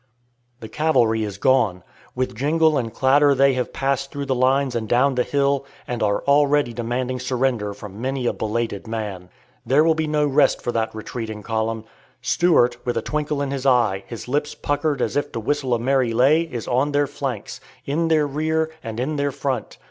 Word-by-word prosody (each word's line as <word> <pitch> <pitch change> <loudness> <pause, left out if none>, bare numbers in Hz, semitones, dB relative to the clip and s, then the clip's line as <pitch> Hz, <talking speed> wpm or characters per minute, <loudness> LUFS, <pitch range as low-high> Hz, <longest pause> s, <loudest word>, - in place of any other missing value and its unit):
The 110 - -7
cavalry 120 -7 +2
is 100 -2 -5
gone. 100 -7 +2 0.3
With 125 0 -1
jingle 155 +5 +2
and 115 -5 -1
clatter 140 +3 +4
they 135 +1 +4
have 125 -1 -2
passed 135 0 -1
through 140 -1 -4
the 135 - 0
lines 130 +1 +2
and 110 -2 -3
down 130 +3 +3
the 125 - +1
hill, 140 +1 +1 0.2
and 120 -1 -3
are 100 -1 +1
already 145 -3 +3
demanding 125 +2 -2
surrender 125 -4 -1
from 100 +1 -9
many 130 0 -2
a - - +1
belated 110 -2 -3
man. 105 -5 -5 0.3
There 140 +4 +4
will 165 0 +4
be 160 -1 -2
no 150 -1 +1
rest 140 -1 +3
for 120 - -3
that 110 -1 -2
retreating 110 -1 -6
column. 110 0 -2 0.4
Stuart, 125 -9 +3
with 120 - -2
a - - -1
twinkle 150 -1 -2
in 140 - -3
his 140 -1 -2
eye, 115 -7 +3
his 115 +3 -8
lips 145 +3 -1
puckered 145 -2 -1
as - - -2
if 145 - -1
to - - -3
whistle 130 +1 0
a - - -2
merry 130 -1 +1
lay, 135 +7 +4
is 120 -3 -5
on 135 +4 +1
their 145 0 +3
flanks, 135 -6 -5 0.2
in 160 +4 0
their 155 -2 +3
rear, 160 +2 -1
and 115 -1 -5
in 150 +4 -2
their 140 0 0
front. 135 -3 -3
130 Hz, 195 wpm, -22 LUFS, 115-145 Hz, 0.4 s, clatter